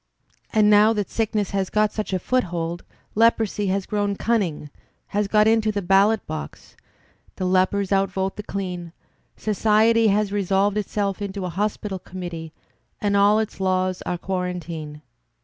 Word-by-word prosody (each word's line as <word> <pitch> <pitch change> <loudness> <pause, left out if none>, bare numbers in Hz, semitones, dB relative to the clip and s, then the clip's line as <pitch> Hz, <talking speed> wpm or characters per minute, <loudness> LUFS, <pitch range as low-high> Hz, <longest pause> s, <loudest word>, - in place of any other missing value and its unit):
And 215 -1 +4
now 210 +1 +6
that 205 -3 -3
sickness 215 -3 -1
has 195 -2 -1
got 215 0 +2
such 215 -2 -4
a 190 - +1
foothold, 175 -6 -2 0.3
leprosy 220 -2 +2
has 190 0 0
grown 205 -1 -1
cimning, 185 -11 -1 0.4
has 205 0 0
got 210 +1 +4
into 220 -1 +3
the 205 -1 -3
ballot 195 +4 +3
box; 155 0 -8 0.6
the 185 - -3
lepers 185 +2 +1
outvote 195 0 0
the - - -5
clean; 180 -4 -5 0.4
society 220 +2 +3
has 205 0 +2
resolved 200 0 +1
itself 200 -1 -2
into 200 -1 -4
a - - -3
Hospital 200 +1 -2
Committee, 175 -3 -7 0.5
and 205 -1 0
all 200 +1 +5
its 220 -2 -2
laws 185 -1 0
are 180 - -3
quarantine. 175 -5 -5
200 Hz, 150 wpm, -23 LUFS, 185-210 Hz, 0.6 s, now